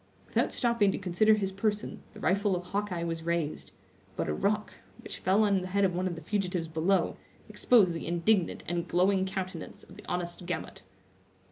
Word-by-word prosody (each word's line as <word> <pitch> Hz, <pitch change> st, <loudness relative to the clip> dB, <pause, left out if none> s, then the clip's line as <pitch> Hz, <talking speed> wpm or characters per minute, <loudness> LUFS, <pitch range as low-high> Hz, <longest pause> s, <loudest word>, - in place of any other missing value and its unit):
Without -, -, +1 dB
stopping 235 Hz, -5 st, +2 dB
to -, -, -3 dB
consider 200 Hz, +4 st, +3 dB
his 195 Hz, -2 st, -1 dB
person, 210 Hz, +2 st, -2 dB
the -, -, -9 dB
rifle 200 Hz, 0 st, +2 dB
of 180 Hz, -, -3 dB
Hawkeye 185 Hz, -1 st, -2 dB
was 165 Hz, -1 st, -3 dB
raised; 170 Hz, -2 st, -2 dB, 0.5 s
but -, -, -2 dB
a 75 Hz, -, 0 dB
rock, 210 Hz, -, 0 dB, 0.3 s
which -, -, -7 dB
fell 195 Hz, +4 st, +3 dB
on 200 Hz, -3 st, +3 dB
the 180 Hz, -, -5 dB
head 200 Hz, +2 st, +2 dB
of 185 Hz, -, +1 dB
one 180 Hz, +2 st, 0 dB
of 175 Hz, -, -3 dB
the 165 Hz, -, -8 dB
fugitives 180 Hz, -2 st, -1 dB
below, 165 Hz, +5 st, +1 dB, 0.3 s
exposed 205 Hz, -8 st, +4 dB
the 165 Hz, -, -5 dB
indignant 175 Hz, +2 st, +1 dB
and 175 Hz, 0 st, -2 dB
glowing 190 Hz, +2 st, +2 dB
countenance 185 Hz, -3 st, -5 dB
of -, -, -15 dB
the -, -, -12 dB
honest 175 Hz, 0 st, -3 dB
Gamut. 175 Hz, -, -4 dB
185 Hz, 190 wpm, -29 LUFS, 175-200 Hz, 0.5 s, exposed